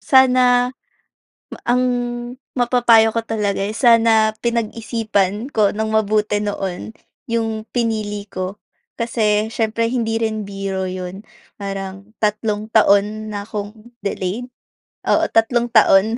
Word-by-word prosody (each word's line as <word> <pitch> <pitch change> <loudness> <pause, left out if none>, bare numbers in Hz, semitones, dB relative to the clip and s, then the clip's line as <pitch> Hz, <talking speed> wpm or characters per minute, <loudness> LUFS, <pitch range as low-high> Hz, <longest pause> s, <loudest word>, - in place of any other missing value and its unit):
sana 260 -1 +5 1.3
ang 250 +1 +3 0.7
mapapayo 235 -2 +4
ko 230 - 0
talaga, 210 -3 -2
eh, 200 - -1
sana 225 -2 +4
pinag-isipan 225 -1 -1
ko 210 -2 +3
nang 220 +1 -2
mabuti 210 -1 +1
noon 195 -3 -4 0.4
'yong 225 -1 -2
pinili 215 -4 -2
ko. 185 0 -5 0.4
Kasi 215 -2 +1
siyempre 225 0 0
hindi 225 -3 0
rin 220 -1 -1
biro 195 -2 -4
'yon. 185 +1 -6 0.4
Parang 195 +1 -6
tatlong 210 0 -1
taon 215 0 +3
na 205 -1 -5
akong 215 +2 -7
delayed? 200 +4 -3 0.5
Oo, - - +2
tatlong 235 +1 +2
taon. 220 -1 +4
215 Hz, 110 wpm, -19 LUFS, 205-230 Hz, 1.3 s, sana